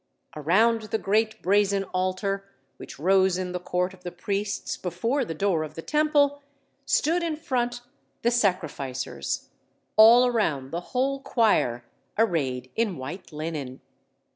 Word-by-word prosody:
Around 215 +10 +3
the 220 - +1
great 220 +2 0
brazen 200 +1 +3
altar, 195 +2 -1 0.3
which - - -10
rose 190 +3 +3
in 185 -1 -3
the 180 - -3
court 180 +1 -1
of 185 - -16
the 175 - -6
priests 200 +2 -3
before 230 - -1
the 165 -9 -5
door 185 -2 +1
of 155 - -8
the 165 - -7
Temple, 290 -2 +2 0.5
stood 355 -8 +2
in 330 -2 -1
front 245 -5 -2 0.4
the 235 - +3
sacrificers, 145 - -2 0.5
all 230 +3 +8
around 160 - 0
the 170 - -3
whole 265 +7 -1
choir, 125 - +1 0.3
arrayed 135 - 0
in 220 -7 0
white 150 +10 -7
linen. 150 -4 -5
195 Hz, 140 wpm, -26 LUFS, 165-230 Hz, 0.5 s, all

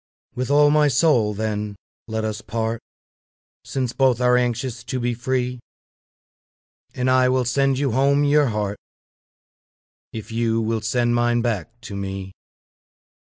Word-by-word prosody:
With 125 +1 -3
all 145 +1 +5
my 150 0 +4
soul, 125 -6 +2
then, 105 -1 -3 0.3
let 110 -1 -3
us 110 +1 -3
part, 115 +1 -3 0.8
Since 130 -3 -3
both 130 -3 +2
are 125 0 +4
anxious 120 0 -1
to 130 - -3
be 120 0 -1
free; 125 +1 -2 1.4
And 125 0 -1
I 130 0 +4
will 130 -1 +1
sand 135 +2 +1
you 140 -2 0
home 140 +4 +3
your 145 0 +4
heart, 105 -3 -2 1.3
If 110 0 -8
you 115 0 0
will 110 0 -1
send 120 +2 +1
mine 120 0 +2
back 115 0 -3
to 100 - -8
me. 95 -1 -5
120 Hz, 140 wpm, -22 LUFS, 110-130 Hz, 1.4 s, all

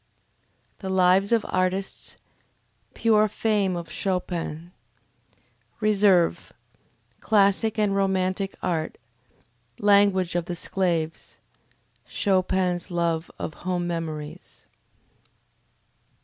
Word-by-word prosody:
The 190 - -5
Lives 190 +2 +3
of 230 -3 +2
Artists 185 +1 -2 0.8
Pure 215 -2 +3
Fame 205 -3 0
of 170 -1 -6
Chopin 175 -3 -3 1.1
Reserve 200 -5 +3 0.7
Classic 210 +1 +2
and 205 -2 +1
Romantic 190 0 0
Art 160 -3 -2 0.8
Language 200 -3 +3
of 175 -1 -1
the 175 - -4
Sclaves 170 -3 -2 0.7
Chopin's 185 -2 0
Love 170 -2 -1
of 155 - -5
Home 180 0 -3
Memories. 160 -3 -6
185 Hz, 80 wpm, -25 LUFS, 175-200 Hz, 1.1 s, Lives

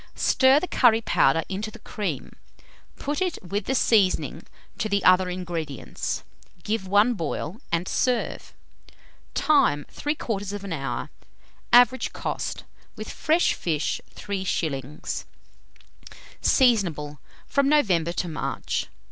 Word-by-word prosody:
Stir 265 +2 +4
the 365 - -4
curry 230 -8 +4
powder 165 -6 +3
into 200 +3 -4
the - - -12
cream; 180 - -4 0.6
put 290 +4 -3
it, 365 -2 0
with 200 +2 -2
the 265 - 0
seasoning, 205 -7 +2 0.3
to 220 -2 -1
the 200 -1 +1
other 185 0 +5
ingredients; 170 -6 -4 0.4
give 210 -3 -2
one 205 +5 +4
boil, 175 - -4
and 170 +2 0
serve. 250 -2 -1 0.8
Time. 265 - +3
3/4 205 - -3
hour. 135 -6 -4 0.6
Average 245 +1 +5
cost, - - -4 0.3
with - - -7
fresh 320 +3 +2
fish, 155 -3 -1
3s. 155 -8 -3 1.2
Seasonable 170 - +2 0.3
from 280 0 +1
November 185 - +3
to 175 - -2
March. 155 -2 -3
200 Hz, 110 wpm, -25 LUFS, 165-245 Hz, 1.2 s, other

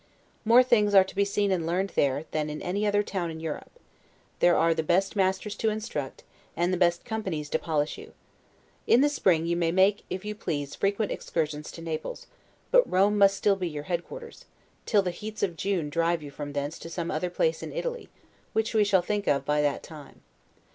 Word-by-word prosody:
More 235 +3 +7
things 210 -5 +3
are 190 - +9
to 190 - -11
be 200 - +3
seen 200 0 0
and 180 -3 0
learned 185 +3 0
there, 140 +2 +1
than 155 -1 -1
in 150 - -5
any 200 +4 -1
other 205 0 +2
town 185 -4 -3
in 160 0 -7
Europe; 160 -2 -5 0.7
there 175 0 +5
are 165 +1 +4
the 160 - -1
best 190 +6 +1
masters 190 +1 0
to 220 - +1
instruct, 210 -11 -4 0.3
and 175 +2 +1
the - - +1
best 175 -1 +2
companies 185 -10 -3
to - - +1
polish 155 -2 -1
you. - - -12 0.7
In 245 - +6
the 290 - +4
spring 175 - +2
you 170 0 0
may 170 -1 +1
make 190 +3 +3
(if 185 +2 -5
you 210 - -3
please) 150 -9 -4
frequent 200 +1 0
excursions 150 -2 -3
to 165 - -9
Naples; 165 - -5 0.5
but - - +4
Rome 195 +3 +3
must 195 0 +5
still 205 -1 +3
be 185 -3 -3
your 150 -2 -6
headquarters, 465 - -6 0.4
till 205 -2 +3
the 180 - -1
heats 210 +4 -6
of 180 -4 0
June 185 -3 -1
drive 165 +1 +1
you 145 - -8
from 145 0 -7
thence 145 +3 -3
to 165 - -8
some 170 0 -3
other 160 +4 -1
place 480 - 0
in - - -6
Italy, 485 -1 -4 0.4
which 220 +1 0
we 215 -1 +4
shall 195 -3 +3
think 205 +2 -2
of 140 -1 +2
by 150 0 +2
that 145 -1 0
time. 150 -4 -12
180 Hz, 210 wpm, -27 LUFS, 160-205 Hz, 0.7 s, are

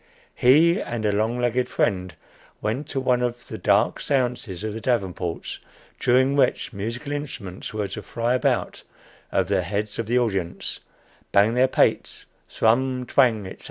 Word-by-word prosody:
He 165 +9 +5
and 115 -2 -4
a 105 - +3
long 110 +4 0
legged 125 +1 0
friend 95 -5 -1 0.4
went 125 +7 -3
to 135 - -2
one 125 -1 +2
of 120 0 -3
the 110 - -6
"dark 105 +3 +2
séances" 125 -8 -1
of 110 -1 -3
the 110 - -6
Davenports, 95 -8 -2 0.4
during 130 +2 +3
which 130 -2 +1
musical 115 +8 -4
instruments 130 -11 -5
were 105 -2 -2
to 105 - -6
fly 120 +3 -1
about 130 - 0 0.5
over 100 - +1
the 95 - +3
heads 105 +4 -3
of 115 - -2
the 120 +2 +2
audience, 95 -8 -2 0.5
bang 100 +3 +4
their 125 +2 +4
pates, - - +1 0.2
thrum, 125 +3 +1
twang, 120 -6 +3
etc. 95 - -9
115 Hz, 160 wpm, -24 LUFS, 105-125 Hz, 0.5 s, He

